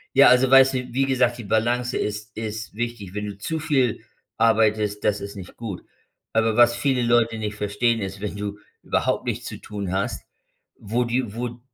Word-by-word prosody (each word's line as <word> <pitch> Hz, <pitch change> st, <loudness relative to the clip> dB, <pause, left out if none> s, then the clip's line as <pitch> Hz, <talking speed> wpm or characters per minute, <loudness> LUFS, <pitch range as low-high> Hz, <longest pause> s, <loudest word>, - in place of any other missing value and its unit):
Ja, 140 Hz, +1 st, +8 dB
also 125 Hz, +1 st, +5 dB
weißt 135 Hz, 0 st, +7 dB
du, -, -, +1 dB, 0.2 s
wie 135 Hz, +2 st, +2 dB
gesagt, 125 Hz, -3 st, +2 dB
die 120 Hz, -, -7 dB
Balance 120 Hz, +4 st, 0 dB
ist 105 Hz, +2 st, -4 dB
ist 110 Hz, 0 st, -5 dB
wichtig. 115 Hz, -4 st, -5 dB
Wenn 105 Hz, 0 st, -3 dB
du 100 Hz, -1 st, -7 dB
zu 160 Hz, +10 st, -3 dB
viel 135 Hz, -7 st, +1 dB, 0.3 s
arbeitest, 110 Hz, -2 st, +2 dB
das 105 Hz, -1 st, +1 dB
ist 100 Hz, +1 st, -7 dB
nicht 95 Hz, -3 st, -10 dB
gut. 110 Hz, -6 st, -6 dB, 0.5 s
Aber 110 Hz, -1 st, +2 dB
was 120 Hz, -1 st, +6 dB
viele 125 Hz, 0 st, +1 dB
Leute 115 Hz, -1 st, +2 dB
nicht 105 Hz, -1 st, -4 dB
verstehen, 105 Hz, +3 st, 0 dB
ist, 95 Hz, 0 st, -5 dB
wenn 105 Hz, -1 st, -4 dB
du 100 Hz, 0 st, -4 dB, 0.2 s
überhaupt -, -, 0 dB
nichts -, -, -3 dB
zu -, -, -6 dB
tun 100 Hz, -3 st, -6 dB
hast, 95 Hz, +1 st, -2 dB, 0.5 s
wo 115 Hz, +4 st, -1 dB
die 120 Hz, -2 st, -1 dB
wo 120 Hz, +1 st, -2 dB
d 120 Hz, +1 st, -13 dB
115 Hz, 195 wpm, -23 LUFS, 105-120 Hz, 0.5 s, Ja